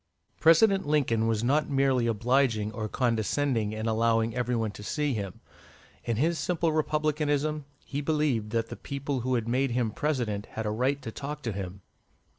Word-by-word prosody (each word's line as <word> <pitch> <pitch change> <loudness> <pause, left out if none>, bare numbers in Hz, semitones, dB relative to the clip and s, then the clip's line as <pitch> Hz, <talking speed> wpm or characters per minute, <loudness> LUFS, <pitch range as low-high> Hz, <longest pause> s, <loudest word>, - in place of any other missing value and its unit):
'" - - -49
President 190 +3 +5
Lincoln 120 -7 +2
was 110 -1 0
not 150 +5 +2
merely 135 -3 +2
obliging 115 -1 +1
or 110 0 -4
condescending 115 -1 0
in 110 0 -4
allowing 115 0 +2
every 125 0 -1
one 110 -2 -1
to 105 - -11
see 145 +6 -1
him; 100 -4 -5 0.6
in 115 -2 -1
his 160 +6 +1
simple 170 -2 0
Republicanism, 150 -1 0 0.2
he 140 +1 -3
believed 145 -8 0
that 115 0 -1
the - - -6
people 140 -1 -4
who 130 +1 0
had 115 -2 -1
made 130 +3 +1
him 120 -2 0
President 115 -7 -2
had 110 - -3
a 105 - 0
right 130 +6 0
to 115 - -5
talk 145 +4 -6
to 115 - -1
him. 95 -1 -6
125 Hz, 180 wpm, -28 LUFS, 110-145 Hz, 0.6 s, President